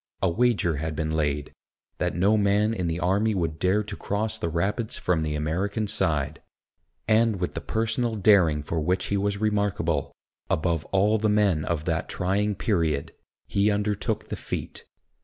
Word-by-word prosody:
A 95 Hz, -, +4 dB
wager 100 Hz, -6 st, +2 dB
had 80 Hz, +1 st, -3 dB
been 80 Hz, 0 st, -2 dB
laid, 75 Hz, -2 st, -1 dB, 0.5 s
that -, -, -1 dB
no 100 Hz, +5 st, +3 dB
man 105 Hz, +1 st, +2 dB
in 90 Hz, -6 st, -2 dB
the 80 Hz, +1 st, -2 dB
army 100 Hz, +4 st, +1 dB
would 80 Hz, -4 st, -2 dB
dare 95 Hz, +4 st, +2 dB
to 105 Hz, 0 st, -6 dB
cross 105 Hz, +2 st, -2 dB
the 85 Hz, -, -3 dB
Rapids 100 Hz, +7 st, -1 dB
from 90 Hz, -3 st, 0 dB
the 75 Hz, -1 st, -2 dB
American 95 Hz, +8 st, -1 dB
side; 80 Hz, -9 st, 0 dB, 0.7 s
and 110 Hz, 0 st, +4 dB
with 90 Hz, -, -2 dB
the -, -, -4 dB
personal 115 Hz, +1 st, -1 dB
daring 90 Hz, -8 st, +4 dB
for 80 Hz, +2 st, -2 dB
which 90 Hz, +4 st, 0 dB
he -, -, +3 dB
was 100 Hz, 0 st, 0 dB
remarkable, 100 Hz, -8 st, 0 dB, 0.4 s
above 80 Hz, -1 st, 0 dB
all 105 Hz, +3 st, +2 dB
the 110 Hz, +1 st, +1 dB
men 100 Hz, -7 st, +2 dB
of 80 Hz, -2 st, -2 dB
that 80 Hz, -2 st, -1 dB
trying 100 Hz, +3 st, 0 dB
period, 80 Hz, -9 st, 0 dB, 0.3 s
he 100 Hz, +1 st, +2 dB
undertook 105 Hz, +1 st, -1 dB
the -, -, -2 dB
feat. -, -, -6 dB
95 Hz, 170 wpm, -26 LUFS, 80-105 Hz, 0.7 s, A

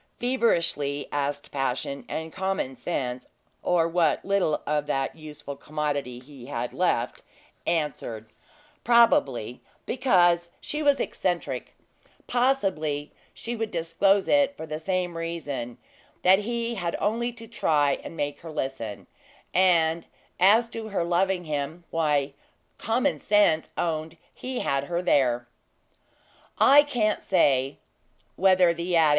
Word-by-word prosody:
feverishly 170 Hz, -, 0 dB
asked 145 Hz, 0 st, -2 dB
Passion; 135 Hz, 0 st, -2 dB
and 160 Hz, 0 st, -4 dB
Common 190 Hz, -8 st, -2 dB
Sense 125 Hz, -5 st, -3 dB, 0.3 s
(or 170 Hz, -2 st, +2 dB
what 165 Hz, -2 st, +1 dB
little 195 Hz, -6 st, +1 dB
of 150 Hz, 0 st, -1 dB
that 135 Hz, -2 st, -1 dB
useful 150 Hz, -2 st, -8 dB
commodity 145 Hz, -4 st, -3 dB
he 130 Hz, -1 st, -13 dB
had 120 Hz, -3 st, -4 dB
left) -, -, 0 dB, 0.5 s
answered 150 Hz, -9 st, -2 dB, 0.6 s
probably 140 Hz, -, +3 dB, 0.2 s
because 175 Hz, -9 st, +3 dB
she 300 Hz, -, -4 dB
was 285 Hz, -2 st, +3 dB
eccentric -, -, -2 dB, 0.5 s
possibly 190 Hz, -, 0 dB, 0.2 s
she 240 Hz, +1 st, -5 dB
would 225 Hz, -1 st, -2 dB
disclose 185 Hz, +3 st, +2 dB
it 285 Hz, -1 st, +3 dB
for 160 Hz, -, -6 dB
the 155 Hz, 0 st, -5 dB
same 180 Hz, 0 st, -1 dB
reason; 145 Hz, -8 st, -4 dB, 0.5 s
that 190 Hz, +2 st, +6 dB
he 235 Hz, +2 st, -2 dB
had 175 Hz, -6 st, -2 dB
only 235 Hz, +3 st, 0 dB
to 230 Hz, -1 st, -11 dB
try 145 Hz, -10 st, +1 dB
and 165 Hz, -, -9 dB
make 145 Hz, 0 st, -2 dB
her 165 Hz, -, -10 dB
listen; 135 Hz, -8 st, -4 dB, 0.5 s
and 170 Hz, -3 st, +3 dB, 0.3 s
as 215 Hz, +6 st, +5 dB
to 225 Hz, -1 st, -6 dB
her 200 Hz, -5 st, -1 dB
loving 180 Hz, +2 st, +1 dB
him, 155 Hz, +2 st, -4 dB
why, 150 Hz, -4 st, +1 dB, 0.5 s
Common 245 Hz, +6 st, 0 dB
Sense 205 Hz, -6 st, +3 dB
owned 160 Hz, -1 st, -2 dB, 0.2 s
he 255 Hz, 0 st, -4 dB
had 140 Hz, 0 st, 0 dB
her 175 Hz, +3 st, -2 dB
there. 125 Hz, -6 st, +2 dB, 1.1 s
I 285 Hz, +2 st, +8 dB
can't 240 Hz, -8 st, 0 dB
say 135 Hz, -7 st, +2 dB, 0.6 s
whether 185 Hz, -2 st, +4 dB
the 170 Hz, +1 st, -2 dB
adage! 160 Hz, -2 st, +5 dB
165 Hz, 125 wpm, -26 LUFS, 145-200 Hz, 1.1 s, I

